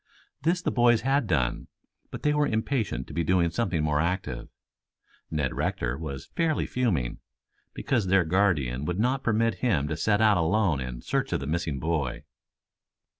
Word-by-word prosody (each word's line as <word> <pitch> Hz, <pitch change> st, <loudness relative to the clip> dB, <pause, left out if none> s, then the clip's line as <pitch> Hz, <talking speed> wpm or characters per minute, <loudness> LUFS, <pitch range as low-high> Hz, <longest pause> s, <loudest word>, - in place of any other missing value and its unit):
This 170 Hz, +4 st, +1 dB
the -, -, 0 dB
boys 120 Hz, -2 st, +4 dB
had 135 Hz, 0 st, +1 dB
done, 65 Hz, -9 st, 0 dB, 0.4 s
but -, -, -8 dB
they 150 Hz, -, +3 dB
were 150 Hz, 0 st, +2 dB
impatient 110 Hz, -, -1 dB
to -, -, -11 dB
be 85 Hz, -, 0 dB
doing 85 Hz, 0 st, +2 dB
something 95 Hz, -9 st, 0 dB
more 75 Hz, -1 st, +1 dB
active. 90 Hz, +4 st, -2 dB, 0.8 s
Ned 75 Hz, -4 st, -1 dB
Rector 60 Hz, 0 st, -1 dB
was 70 Hz, -3 st, -7 dB
fairly 165 Hz, -3 st, +1 dB
fuming, 95 Hz, -, -1 dB, 0.6 s
because 115 Hz, -8 st, 0 dB
their 95 Hz, 0 st, +4 dB
guardian 80 Hz, -8 st, +1 dB
would 90 Hz, +2 st, -2 dB
not 125 Hz, +5 st, +1 dB
permit 115 Hz, -3 st, +1 dB
him 80 Hz, -, +1 dB
to 75 Hz, -, -1 dB
set 105 Hz, +6 st, +1 dB
out 110 Hz, -3 st, +5 dB
alone 85 Hz, -2 st, +2 dB
in 60 Hz, -1 st, -6 dB
search -, -, -1 dB
of -, -, +1 dB
the 70 Hz, -, -5 dB
missing 80 Hz, -1 st, -2 dB
boy. 75 Hz, -4 st, -2 dB
90 Hz, 170 wpm, -27 LUFS, 75-115 Hz, 0.8 s, out